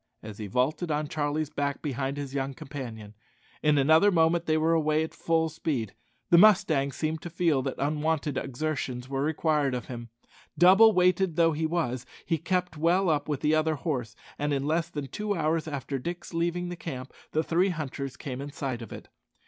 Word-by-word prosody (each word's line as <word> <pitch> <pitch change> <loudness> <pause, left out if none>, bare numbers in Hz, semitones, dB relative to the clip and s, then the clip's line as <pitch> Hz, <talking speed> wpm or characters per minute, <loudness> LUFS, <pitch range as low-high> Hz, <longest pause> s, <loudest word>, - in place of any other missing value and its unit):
as 105 -1 -9
he 105 - -4
vaulted 130 - 0
on 150 0 -1
Charlie's 150 0 -2
back 140 -1 -2
behind 140 -1 -2
his 140 -2 -5
young 135 -1 -2
companion. 115 -8 -8 0.5
In 150 -1 +3
another 160 +8 +5
moment 170 -1 +2
they 155 0 +3
were 160 +1 +2
away 155 -1 +2
at 160 - -6
full 165 -1 +1
speed. 145 -9 -3 0.4
The 170 - +8
mustang 180 -9 +5
seemed 155 +3 -3
to 175 - -6
feel 165 -5 +1
that 135 0 -3
unwonted 150 0 -1
exertions 130 -2 -3
were 135 0 -2
required 150 -2 +1
of 125 - -4
him. 120 -2 -8 0.5
Double 195 +6 +7
weighted 180 -2 +2
though 165 0 +4
he 160 +1 -1
was, 130 -7 -2 0.2
he 165 -2 0
kept 180 0 -1
well 175 +3 +3
up 145 0 -1
with 145 -2 -2
the 150 - +2
other 155 0 +2
horse, 125 -7 -3 0.2
and 145 +1 0
in 140 0 -1
less 160 +2 0
than 145 -4 -4
two 210 +8 -3
hours 160 -1 0
after 140 -2 -4
Dick's 175 +6 -6
leaving 175 +1 -1
the 175 - -5
camp 135 -6 -7 0.2
the 155 - +1
three 175 +4 +2
hunters 140 -5 -4
came 130 -2 -5
in 145 +1 -6
sight 135 -5 -4
of 115 - -9
it. - - -9
155 Hz, 195 wpm, -28 LUFS, 135-165 Hz, 0.5 s, The